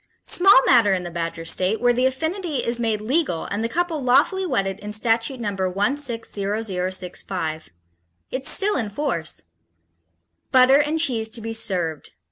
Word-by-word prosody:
Small 355 -7 +5
matter 225 -6 +4
in 180 - -4
the 175 - -7
Badger 165 -1 -4
State 185 +5 0
when 245 0 +3
the 255 +1 +3
affinity 320 +3 -3
is 235 0 -1
made 220 -3 -1
legal 250 - -1
and 205 +2 -3
the 230 - -1
couple 335 +1 -2
lawfully 365 +9 +2
wedded 195 - -1
in 210 0 -7
Statute 230 +4 0
No. 220 -3 -2
160,065. 195 - -2 0.6
It's 260 +1 -1
still 410 -2 +3
in 225 -5 -2
force: 205 - -3 1.1
_Butter 260 +2 +6
and 305 +2 -2
cheese 235 -8 +1
to 230 +1 -1
be 225 0 -5
served. 175 -8 -2
225 Hz, 150 wpm, -22 LUFS, 190-265 Hz, 1.1 s, Butter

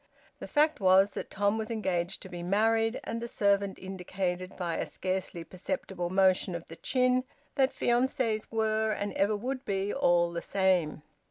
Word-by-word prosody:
The - - -7
fact 305 +1 +2
was 190 +1 +5
that - - -6
Tom 205 +2 +1
was 220 - -4
engaged 190 -5 -2
to - - -8
be 175 -1 -6
married, 225 +5 +2
and 230 0 -4
the 235 - -3
servant 200 -3 +1
indicated, 185 -1 -4
by 170 -3 -2
a - - -2
scarcely 185 -2 -3
perceptible 185 -1 -4
motion 185 -1 +3
of 170 - -7
the 165 - -8
chin, 255 +5 +2 0.3
that 270 -1 +2
fiances 240 -3 0
were 220 -1 +1
and 205 0 -3
ever 205 +2 +2
would 255 +5 -4
be 195 0 -1
all 175 -9 +3
the 170 0 -4
same. 185 -6 +1
195 Hz, 170 wpm, -29 LUFS, 185-225 Hz, 0.3 s, was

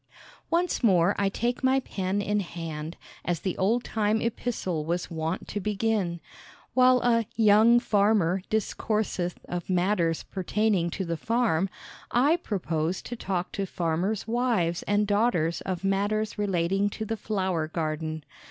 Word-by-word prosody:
"Once 345 -3 0
more 185 -3 +4
I 200 -1 +2
take 240 +6 -2
my 260 +1 +4
pen 195 -4 -2
in 210 +1 +1
hand," 165 -3 -5 0.3
as 175 -3 -1
the 185 - -2
old 230 +6 +2
time 215 0 0
epistle 220 -8 -2
was 175 +3 -2
wont 160 +2 -3
to 205 - -3
begin. 205 -3 -1 0.5
While 255 -1 +5
a 230 -3 +2
"Young 220 +2 +6
Farmer" 200 -5 +2
discourseth 210 -4 -1
of 175 0 -4
matters 180 -3 +1
pertaining 195 -1 0
to 190 +2 -3
the 170 -1 -2
farm, 205 -2 +1 0.4
I 285 +8 +3
propose 175 - -2
to 240 - -6
talk 185 -5 -3
to 195 -1 -3
farmers' 180 +6 -1
wives 225 -8 +1
and 205 +1 +2
daughters 205 -6 +1
of 185 -1 -3
matters 205 +2 0
relating 195 0 +1
to 220 - -5
the 225 - -2
flower 190 -7 -1
garden. 155 -1 -3
195 Hz, 145 wpm, -27 LUFS, 170-220 Hz, 0.5 s, Young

